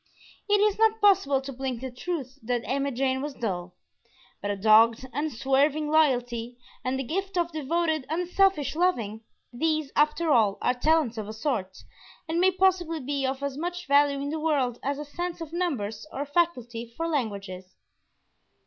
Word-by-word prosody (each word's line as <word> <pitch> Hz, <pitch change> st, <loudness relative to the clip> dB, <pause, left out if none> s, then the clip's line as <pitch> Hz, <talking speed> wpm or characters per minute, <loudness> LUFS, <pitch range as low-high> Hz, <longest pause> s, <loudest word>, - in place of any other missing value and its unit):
It 410 Hz, 0 st, +4 dB
is 420 Hz, 0 st, +2 dB
not 445 Hz, 0 st, +4 dB
possible 380 Hz, -10 st, +4 dB
to 275 Hz, 0 st, -7 dB
blink 260 Hz, -1 st, -3 dB
the 260 Hz, -1 st, -5 dB
truth 270 Hz, -1 st, -5 dB
that 240 Hz, +1 st, -1 dB
Emma 275 Hz, +1 st, 0 dB
Jane 260 Hz, +1 st, 0 dB
was 290 Hz, -1 st, -5 dB
dull; 180 Hz, -6 st, -4 dB, 0.7 s
but 205 Hz, -, -3 dB
a 205 Hz, -, 0 dB
dogged, 225 Hz, +4 st, +5 dB
unswerving 290 Hz, +2 st, +1 dB
loyalty, 245 Hz, -6 st, +1 dB, 0.3 s
and 260 Hz, +1 st, -1 dB
the 270 Hz, -, -2 dB
gift 385 Hz, +8 st, -3 dB
of 345 Hz, -1 st, +1 dB
devoted, 315 Hz, -1 st, -1 dB
unselfish 355 Hz, -1 st, +1 dB
loving, 235 Hz, -, 0 dB, 0.3 s
these, 310 Hz, +2 st, 0 dB
after 300 Hz, +2 st, +2 dB
all, 215 Hz, -6 st, +4 dB
are 250 Hz, -, +2 dB
talents 255 Hz, -3 st, +1 dB
of 210 Hz, -, -5 dB
a 215 Hz, -, -6 dB
sort, 220 Hz, -6 st, -2 dB, 0.5 s
and 325 Hz, +1 st, -1 dB
may 375 Hz, -, +6 dB
possibly 370 Hz, -3 st, +1 dB
be 275 Hz, 0 st, -2 dB
of 265 Hz, +1 st, -3 dB
as 280 Hz, 0 st, -3 dB
much 355 Hz, +1 st, -4 dB
value 280 Hz, 0 st, +3 dB
in 285 Hz, +1 st, -3 dB
the 315 Hz, -, -2 dB
world 275 Hz, -6 st, 0 dB
as 280 Hz, +1 st, -2 dB
a 295 Hz, -, -6 dB
sense 345 Hz, +4 st, -5 dB
of 330 Hz, -1 st, -7 dB
numbers 265 Hz, -, -2 dB
or 275 Hz, -, -4 dB
a -, -, -2 dB
faculty 245 Hz, -8 st, -1 dB
for 330 Hz, -, -1 dB
languages. 200 Hz, -, -4 dB
280 Hz, 175 wpm, -27 LUFS, 245-330 Hz, 0.7 s, may